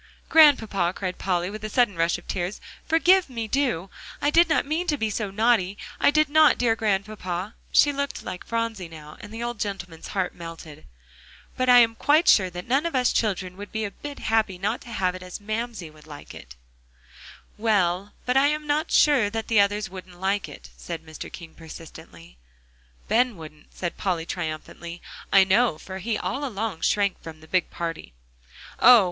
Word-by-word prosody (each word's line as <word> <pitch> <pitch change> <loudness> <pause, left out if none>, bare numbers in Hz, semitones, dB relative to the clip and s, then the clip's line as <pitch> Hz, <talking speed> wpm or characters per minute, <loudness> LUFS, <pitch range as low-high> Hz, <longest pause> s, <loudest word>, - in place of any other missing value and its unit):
"Grandpapa," 220 - +5
cried 185 -2 -4
Polly, 180 0 -1
with 215 0 -8
a 215 - -3
sudden 240 -4 +2
rush 165 +1 +1
of 175 - -16
tears, 180 +3 -3 0.3
"forgive 350 +1 +4
me, 230 -3 -4
do; 225 -8 -1 0.3
I 290 - +1
did 335 +2 +5
not 315 - +2
mean 320 +5 -2
to 295 - +1
be 220 -4 -1
so 210 -1 -2
naughty. 205 -2 +1 0.2
I - - +5
did 305 +1 +3
not, 310 +1 +5
dear 235 -2 +2
Grandpapa." 200 -2 -2 0.2
She 290 - +5
looked 280 0 -3
like 180 - -6
Phronsie 230 -5 -3
now, 155 -2 -12
and 205 - -10
the 225 +1 -5
old 240 -2 -4
gentleman's 180 -5 -5
heart 190 -2 -2
melted. 165 -3 -10 0.7
"But 255 0 0
I 245 - +8
am 225 -1 +3
quite 295 +8 +3
sure 190 -3 +5
that 180 0 -8
none 275 +7 +2
of 335 - -5
us 250 -1 +2
children 190 -4 -1
would 205 0 -9
be 220 -1 -2
a 200 - -5
bit 290 +5 -9
happy 220 -4 0
not 210 +6 -2
to - - -12
have 185 -5 0
it 185 - -9
as 180 -1 -8
Mamsie 215 -4 -4
would 155 0 -18
like." 145 - -11 1.0
"Well, 200 -3 +1
but 250 - 0
I 270 +1 +5
am 300 +1 -1
not 295 +1 0
sure 270 -9 +4
that 225 +1 -5
the 225 -2 +4
others 205 +1 +2
wouldn't 185 -1 -11
like 195 +2 -1
it," - - -12
said 165 -2 -7
Mr. 155 0 -9
King 165 -3 -10
persistently. 155 - -13 0.7
"Ben 245 -2 +2
wouldn't," 155 -2 -13
said 175 -2 -4
Polly 175 -4 -1
triumphantly, 170 +2 -6 0.3
"I 195 - +7
know, 190 -2 +2
for 190 +3 -8
he 215 +3 -2
all 275 +6 -3
along 215 - -3
shrank 200 -2 +1
from 160 -1 -10
the 160 - -16
big 185 +1 0
party." 165 - -5 0.7
"Oh! 245 0 +9
205 Hz, 190 wpm, -25 LUFS, 175-240 Hz, 1.0 s, Oh